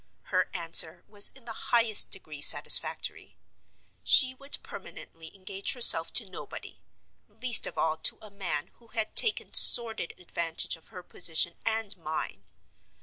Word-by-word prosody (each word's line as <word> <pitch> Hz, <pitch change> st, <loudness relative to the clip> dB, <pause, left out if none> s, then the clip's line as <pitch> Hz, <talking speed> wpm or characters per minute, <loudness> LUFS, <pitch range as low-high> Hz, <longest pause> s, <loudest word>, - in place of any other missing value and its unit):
Her -, -, -2 dB
answer 165 Hz, -2 st, -1 dB
was 205 Hz, -1 st, +6 dB
in 265 Hz, -3 st, -19 dB
the 230 Hz, -, -10 dB, 0.2 s
highest 230 Hz, -3 st, +1 dB
degree 155 Hz, -6 st, -9 dB
satisfactory. -, -, +1 dB, 0.7 s
She 260 Hz, -2 st, +2 dB
would 275 Hz, +2 st, -4 dB
permanently 165 Hz, 0 st, -13 dB
engage 195 Hz, +1 st, -5 dB
herself 230 Hz, -10 st, +4 dB
to 225 Hz, -, +2 dB
nobody—least 235 Hz, +5 st, -5 dB
of -, -, -12 dB
all 160 Hz, -1 st, -3 dB
to -, -, 0 dB
a 215 Hz, -2 st, -17 dB
man 180 Hz, -7 st, -7 dB
who 235 Hz, -, -25 dB
had 220 Hz, -2 st, -7 dB
taken 445 Hz, -3 st, 0 dB
sordid 225 Hz, -7 st, +6 dB
advantage 170 Hz, -2 st, -5 dB
of 165 Hz, -, -22 dB
her 180 Hz, -, -14 dB
position 170 Hz, -1 st, +1 dB
and 220 Hz, -2 st, -3 dB
mine. 155 Hz, -, -8 dB
195 Hz, 140 wpm, -25 LUFS, 165-230 Hz, 0.7 s, was